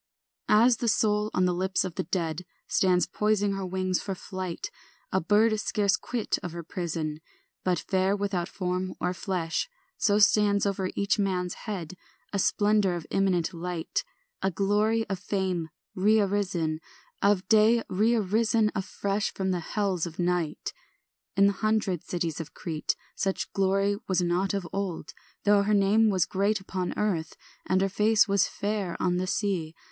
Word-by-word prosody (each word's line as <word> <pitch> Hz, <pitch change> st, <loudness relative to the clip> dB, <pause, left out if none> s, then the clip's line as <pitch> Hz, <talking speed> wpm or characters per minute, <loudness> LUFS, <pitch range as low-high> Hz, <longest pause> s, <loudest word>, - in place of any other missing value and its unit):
ANT. 210 Hz, -, +6 dB
3 -, -, +6 dB
As 245 Hz, -2 st, +4 dB
the 240 Hz, -, -2 dB
soul 210 Hz, 0 st, +2 dB
on 185 Hz, -, +2 dB
the 180 Hz, -, +2 dB
lips 185 Hz, +2 st, 0 dB
of 185 Hz, -, -4 dB
the -, -, -2 dB
dead 165 Hz, -1 st, -2 dB, 0.2 s
Stands 180 Hz, -1 st, +3 dB
poising 210 Hz, -1 st, +1 dB
her 195 Hz, -1 st, -3 dB
wings 185 Hz, 0 st, -1 dB
for 195 Hz, -2 st, -4 dB
flight, 185 Hz, -2 st, -5 dB, 0.4 s
A 190 Hz, -, +1 dB
bird 215 Hz, +4 st, +3 dB
scarce 205 Hz, -2 st, +1 dB
quit 235 Hz, +1 st, -2 dB
of 175 Hz, -, -6 dB
her 170 Hz, 0 st, -6 dB
prison, 160 Hz, -3 st, -3 dB, 0.4 s
But 180 Hz, -1 st, +1 dB
fair 190 Hz, +1 st, +2 dB
without 195 Hz, -3 st, -2 dB
form 185 Hz, 0 st, -3 dB
or 180 Hz, 0 st, 0 dB
flesh, 180 Hz, -, -2 dB, 0.3 s
So 205 Hz, -1 st, +3 dB
stands 205 Hz, -1 st, +4 dB
over 195 Hz, -2 st, -1 dB
each 200 Hz, +2 st, +1 dB
man's 180 Hz, -3 st, 0 dB, 0.2 s
head 180 Hz, -5 st, -4 dB, 0.4 s
A 200 Hz, -, 0 dB
splendour 205 Hz, -2 st, +2 dB
of 170 Hz, -2 st, -6 dB
imminent 185 Hz, -3 st, +1 dB
light, 170 Hz, -1 st, -3 dB, 0.4 s
A -, -, +2 dB
glory 210 Hz, +4 st, +1 dB
of 195 Hz, -2 st, -3 dB
fame 185 Hz, -4 st, -2 dB, 0.3 s
rearisen, 195 Hz, -5 st, +1 dB, 0.4 s
Of 200 Hz, -2 st, +2 dB
day 220 Hz, +2 st, +5 dB
rearisen 215 Hz, +1 st, +2 dB
afresh 200 Hz, +1 st, -2 dB
From 190 Hz, -1 st, -2 dB
the 180 Hz, -, 0 dB
hells 185 Hz, -1 st, -1 dB
of 165 Hz, -, -10 dB
night. 175 Hz, -3 st, -1 dB, 0.6 s
In 200 Hz, -, +6 dB
the 200 Hz, -, +4 dB
hundred 215 Hz, -5 st, 0 dB
cities 170 Hz, -3 st, -3 dB
of 165 Hz, -, -7 dB
Crete 160 Hz, -3 st, -2 dB, 0.2 s
Such 195 Hz, -1 st, -2 dB
glory 195 Hz, +1 st, +2 dB
was 185 Hz, -1 st, +1 dB
not 180 Hz, +3 st, +1 dB
of 190 Hz, -3 st, -3 dB
old, 195 Hz, -4 st, -3 dB, 0.3 s
Though 205 Hz, -1 st, +5 dB
her 210 Hz, +1 st, +2 dB
name 205 Hz, +3 st, +4 dB
was 190 Hz, -4 st, +2 dB
great 200 Hz, +2 st, 0 dB
upon 185 Hz, -2 st, -4 dB
earth 175 Hz, -7 st, -1 dB, 0.3 s
And 185 Hz, 0 st, +2 dB
her 195 Hz, -, +3 dB
face 210 Hz, +3 st, +3 dB
was 200 Hz, -1 st, +3 dB
fair 200 Hz, -3 st, -3 dB
on 180 Hz, -1 st, +1 dB
the 185 Hz, +1 st, -1 dB
sea. 180 Hz, -6 st, -1 dB
195 Hz, 165 wpm, -27 LUFS, 180-205 Hz, 0.6 s, ANT